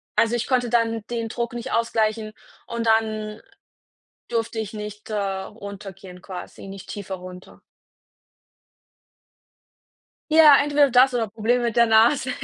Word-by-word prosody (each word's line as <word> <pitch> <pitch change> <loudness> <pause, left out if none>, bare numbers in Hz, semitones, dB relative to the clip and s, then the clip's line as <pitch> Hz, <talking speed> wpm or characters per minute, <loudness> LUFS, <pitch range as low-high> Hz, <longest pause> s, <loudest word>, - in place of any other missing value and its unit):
also 230 0 +2
ich 240 - -2
konnte 250 -2 +1
dann 230 -2 +1
den 230 -1 -3
Druck 235 +1 -4
nicht 240 -1 -6
ausgleichen 220 -1 0 0.3
und 235 -1 -3
dann 220 -1 0 0.9
durfte 230 -1 -2
ich 215 -1 -5
nicht, 210 0 -8
äh, - - -2
runtergehen 195 -1 -6
quasi 190 +1 -9
nicht 195 -1 -10
tiefer 195 -2 -6
runter. 180 0 -12 2.7
Ja, 310 -3 +8
entweder 290 0 +3
das 255 +2 +6
oder 235 -2 0
Problem 225 +4 0
mit 235 -2 -1
der 235 0 +5
Nase, 230 +4 +4
225 Hz, 130 wpm, -23 LUFS, 205-235 Hz, 2.7 s, Ja